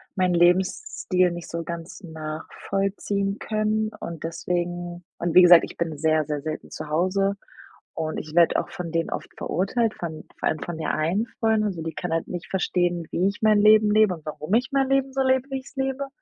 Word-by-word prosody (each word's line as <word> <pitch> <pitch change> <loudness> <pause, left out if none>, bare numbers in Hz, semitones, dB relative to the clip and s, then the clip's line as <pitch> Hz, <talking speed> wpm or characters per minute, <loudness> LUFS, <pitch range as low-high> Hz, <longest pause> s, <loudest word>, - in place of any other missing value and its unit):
meinen 185 -2 +2
Lebensstil 180 - +2
nicht 175 0 -7
so 170 0 -4
ganz 170 +3 -7
nachvollziehen 195 +5 -3
können 215 0 0
und 165 -2 -7
deswegen 175 +1 -3 0.2
und 170 -1 -2
wie 180 - +10
gesagt, 175 -1 +9
ich - - -11
bin 165 -3 -2
sehr, 155 0 +2
sehr 150 -1 -3
selten 155 +1 -6
zu 155 - -6
Hause 185 +5 +1 0.6
und 155 -1 -3
ich 155 0 -7
werde 170 -1 +5
auch - - -6
von 175 -2 -6
denen 165 0 0
oft - - -5
verurteilt, 215 +6 0
von 160 -2 -6
vor - - +1
allem 155 - -3
von 175 - -5
der - - -1
einen 175 +9 0
Freundin. 220 -1 +2
Also, 185 -6 -2
die 165 -1 -5
kann 175 0 -4
halt 165 - -1
nicht 175 -1 -5
verstehen, 175 -2 0
wie 180 - +1
ich 200 - -5
mein 215 -1 +5
Leben 215 0 +6
lebe 215 -4 +4
und 160 -2 -13
warum 155 +3 -6
ich 250 +3 +2
mein 270 -1 +2
Leben 270 0 +2
so 270 - +2
lebe, 260 +1 +2
wie 270 - -2
ich's 270 +2 -16
lebe. 270 +1 -1
180 Hz, 205 wpm, -24 LUFS, 165-215 Hz, 0.6 s, wie